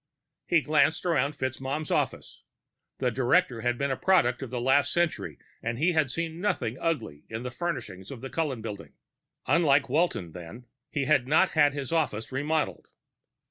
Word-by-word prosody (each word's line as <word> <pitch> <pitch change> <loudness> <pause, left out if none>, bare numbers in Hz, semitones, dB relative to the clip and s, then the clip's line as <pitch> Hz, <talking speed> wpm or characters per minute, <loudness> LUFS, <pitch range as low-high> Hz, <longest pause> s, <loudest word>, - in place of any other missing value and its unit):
He 170 -2 +4
glanced 155 +2 +2
around 150 -4 +1
FitzMaugham's 135 +2 -3
office. - - -2 0.6
The 125 -2 0
director 130 0 +2
had 120 0 0
been 140 +1 -1
a - - +1
product 135 -9 +2
of 135 - -5
the 125 0 -3
last 135 +4 +3
century, 170 -2 -1 0.2
and 115 0 -3
he 165 +7 +3
had 155 -4 +2
seen 165 +3 -4
nothing 155 - -1
ugly 115 - -2
in 110 +2 -5
the 125 - -4
furnishings 120 - -4
of 135 - -7
the 135 - -6
Cullen 140 -9 -2
Building. 105 -3 -7 0.5
Unlike 145 -5 +3
Walton, 145 - 0
then, 90 +9 -10 0.2
he 140 -2 -1
had 135 -4 +3
not 160 +6 +4
had 145 -3 +4
his 140 -3 -4
office 145 -10 -1
remodeled. 150 +4 -1
140 Hz, 170 wpm, -28 LUFS, 120-160 Hz, 0.6 s, He